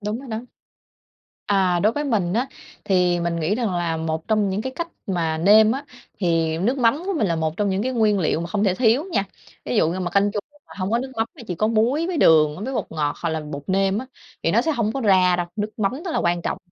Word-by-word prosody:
Đúng 210 +3 -3
rồi 270 - -11
đó. 225 +3 -4 1.0
À. 185 -3 +2
Đối 215 +3 +3
với 295 +2 -2
mình 205 -10 0
á, 240 +6 +1 0.4
thì 180 -3 +2
mình 170 0 -1
nghĩ 170 +7 +1
rằng 225 -6 -1
là 170 -2 -1
một 160 +2 -3
trong 215 -2 +2
những 200 +3 -2
cái 260 - -4
cách 340 0 -3 0.2
mà 165 -4 -1
nêm 215 +6 +6
á, 275 +2 -4 0.3
thì 165 -3 +1
nước 245 +9 0
mắm 250 +7 +2
của 395 - 0
mình 215 - +1
là 170 -3 0
một 160 0 -2
trong 205 -1 0
những 190 +1 0
cái 260 +2 -1
nguyên 215 -4 +2
liệu 160 -1 0
mà 170 - -3
không 205 +3 -1
thể 190 -3 +2
thiếu 245 - +3
nha. 195 - +1 0.4
Ví 125 - -2
dụ 160 - +3
như 185 - -3
mà 175 -1 -2
canh 200 +1 +2
chua 205 - -2 0.3
mà - - -13
hông 185 +2 -2
có 235 - +2
nước 265 +1 -5
mắm 225 - +1
mà 245 - -11
chỉ 180 - -3
có 215 - 0
muối 235 +9 +1
với 360 -2 -2
đường 155 +3 +4
với 265 +2 -4
bột - - -2
ngọt 150 -2 -1
hoặc 170 - 0
là 160 -1 -2
bột 150 -2 -7
nêm 195 +1 +1
á, 260 - -5 0.4
thì - - +1
nó - - +4
sẽ 320 - 0
hông 225 -4 0
có 270 - -3
ra 185 -5 +4
đâu. 175 -1 -2
Nước 210 +1 -4
mắm 200 +2 +1
rất 355 - -3
là - - 0
quan 170 0 0
trọng. - - -2
200 Hz, 275 wpm, -22 LUFS, 170-225 Hz, 1.0 s, nêm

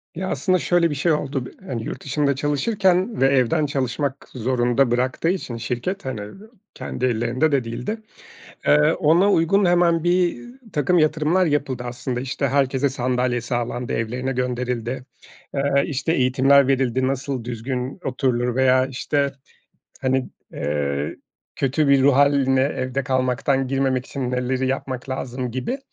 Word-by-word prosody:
Ya, 185 +2 -3
aslında 185 -1 +1
şöyle 175 -1 +2
bir 145 - -3
şey 165 +5 +1
oldu, 140 -4 -1
bi - - -9 0.2
hani, 115 -3 -3
yurt - - -6
dışında 140 0 0
çalışırken 185 - +1
ve 135 - +6
evden 135 +3 +2
çalışmak 140 0 -2
zorunda 125 +1 +1
bıraktığı 130 +6 0
için 170 -10 -3
şirket 125 - -3
hani, 130 -5 -4
iii, 105 - -9 0.4
kendi 130 - -4
ellerinde 125 +5 +1
de 140 -3 +2
değildi. 120 - -4 0.7
Eee, 150 +2 +5
ona 170 +6 +3
uygun 195 +4 +3
hemen 175 -2 +3
birtakım 180 - 0
yatırımlar 155 +4 +2
yapıldı. 145 -5 -1
Aslında 125 0 -4
işte 135 +2 -2
herkese 135 0 +1
sandalye 125 -1 0
sağlandı, 120 +1 -3
evlerine 125 +4 -2
gönderildi, 125 0 -2 0.5
eee, 140 0 +2
işte 150 +3 -1
eğitimler 135 0 +4
verildi, 130 -1 +1
nasıl 135 -1 -2
düzgün 125 - -4
oturulur 125 -2 0
veya 130 0 +4
işte, 140 +2 -1 0.7
hani, 130 -1 0 0.2
eee, 70 +1 -2 0.4
kötü 140 +3 +1
bir 140 -1 +5
ruh 140 -1 +5
hâline 140 -2 +4
evde 135 -1 -1
kalmaktan 130 0 0
girmemek 130 -1 0
için 130 -3 -4
neleri 125 +1 -1
yapmak 130 0 -3
lazım 125 -1 -4
gibi. 130 - -3
135 Hz, 140 wpm, -22 LUFS, 125-150 Hz, 0.7 s, ve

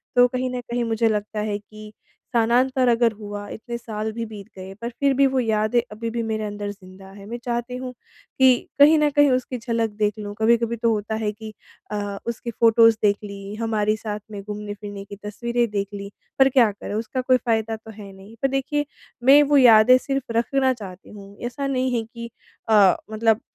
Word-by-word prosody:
तो 245 0 +6
कहीं 255 +1 -2
न 250 - -3
कहीं 240 0 -3
मुझे 225 0 +1
लगता 210 0 -2
है 210 -1 -1
कि 215 +1 -13 0.4
स्थानांतर 250 +3 +2
अगर 235 0 +3
हुआ, 205 -1 -7
इतने 235 +2 -6
साल 220 -2 -5
भी 230 +1 -4
बीत 210 -3 -10
गए, 190 +1 -8
पर 235 - -3
फिर 280 -1 +3
भी 275 +1 +4
वो 265 0 0
यादें 220 0 +1
अभी 225 +2 -4
भी 235 +1 -3
मेरे 220 -1 -2
अंदर 205 -1 -4
ज़िंदा 190 -1 -14
है। 200 0 -12
मैं 235 +3 -6
चाहती 240 0 -3
हूँ 255 0 -6 0.5
कि 260 -2 +4
कहीं 300 +3 +7
न 300 -1 +3
कहीं 290 0 +4
उसकी 255 0 -1
झलक 230 -1 -1
देख 210 -1 +1
लूँ। 205 -1 -6
कभी-कभी 230 +1 +2
तो 230 0 +1
होता 215 0 -2
है 220 -1 -1
कि 215 +1 -10 0.4
अ, 205 -1 -3
उसकी 235 0 -4
फोटोज़ 230 0 +6
देख 205 -1 +3
ली, 200 -1 -8
हमारी 215 -1 0
साथ 210 -1 -5
में 205 -1 -6
घूमने-फिरने 205 -1 -7
की 200 - -9
तस्वीरें 235 +3 -1
देख 200 -1 -1
लीं। 200 0 -6 0.3
पर 265 0 +6
क्या 250 -5 +4
करें, 200 0 -8
उसका 230 +4 -2
कोई 255 0 +3
फ़ायदा 225 -2 -1
तो 220 0 -12
है 205 -2 -11
नहीं। 195 +4 -14
पर 270 - +3
देखिए 275 +2 -1 0.4
मैं 275 +3 +8
वो 290 0 +3
यादें 245 -1 +7
सिर्फ़ 270 -1 -3
रखना 260 +2 +2
चाहती 195 -6 -11
हूँ 200 -1 -12
ऐसा 275 +3 -3
नहीं 260 -1 0
है 225 - -1
कि 235 +1 -9 0.4
अ, 205 -4 +6 0.2
मतलब 220 +1 +2
225 Hz, 205 wpm, -23 LUFS, 210-245 Hz, 0.5 s, मैं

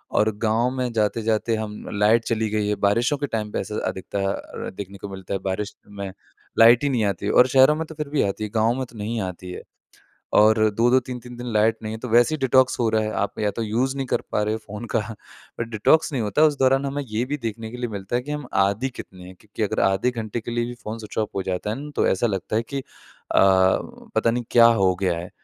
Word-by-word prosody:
और 105 +1 +4
गाँव 115 +3 +1
में 125 -2 -2
जाते-जाते 110 +1 0
हम 110 -1 -4 0.3
लाइट 110 +2 +4
चली 110 -2 0
गई 105 -1 0
है, 105 - +1
बारिशों 120 +10 +1
के 145 - -2
टाइम 105 -3 -3
पे - - -2
ऐसा 105 - -5
अधिकतर 95 +1 -4
देखने 100 0 -7
को 100 - -8
मिलता 95 0 -7
है, 95 - -1
बारिश 100 +2 -2
में 100 -1 -6 0.5
लाइट 115 +3 +7
ही 145 - +2
नहीं 120 -5 +1
आती 100 -3 -2
है - - +1
और 125 - +6
शहरों 135 +3 +5
में 160 +1 -3
तो 160 - -10
फ़िर 150 -2 -4
भी 150 - +1
आती 100 +2 -2
है 105 - -3
गाँव 110 +2 +3
में 130 - -2
तो 120 -2 -16
नहीं 105 +3 -3
ही 115 - -1
आती 90 0 -8
है। - - -7 0.7
और 110 +1 +6
2-2, 120 +5 +3
3-3 125 -1 -8
दिन 120 0 -7
लाइट 110 +1 +3
नहीं 110 0 -4
है, 110 - -5
तो 125 - -6
वैसे 120 +7 +4
ही - - -3
डिटॉक्स 130 0 +3
हो 115 - +2
रहा 110 0 +2
है। 110 - -2
आप 100 +1 -2
या 105 -1 +1
तो 115 - -1
यूज़ 125 +5 0
नहीं 135 -1 -2
कर - - 0
पा 105 - +1
रहे 105 +1 0
हो - - -3
फ़ोन 105 +2 -7
का - - +4
अ, 110 +1 -10
डिटॉक्स 115 +8 +2
नहीं 125 -4 -1
होता, 105 +8 +1
उस 150 -2 +2
दौरान 135 +1 +3
हमें 140 +1 -2
ये 110 +3 -1
भी 145 +3 -3
देखने 110 0 -4
के 125 - -7
लिए 120 -1 -3
मिलता 100 +3 -3
है 125 - -1
कि 145 - -8
हम 150 -3 -4 0.2
आदि 105 +7 0
कितने 90 -1 -10
हैं। 95 - -11
क्योंकि 105 +1 -7
अगर 105 - 0
आधे 95 +6 +1
घंटे 115 -1 -4
के 120 - -7
लिए 120 0 0
भी 120 - -6
फ़ोन 110 +2 -5
स्विच 105 -1 -8
ऑफ 110 - +1
हो 95 - -1
जाता 95 +3 -3
है 110 - -2
ना 150 0 -7
तो - - +2
ऐसा 95 +5 +2
लगता 100 +1 -2
है 115 - +2
कि 140 +4 -5
अ, - - -13 0.5
पता 95 +4 +2
नहीं 120 0 -2
क्या 115 -1 +7 0.2
हो 95 -1 +4
गया 90 -3 +1
है। 90 +2 -7
110 Hz, 260 wpm, -23 LUFS, 105-125 Hz, 0.7 s, लाइट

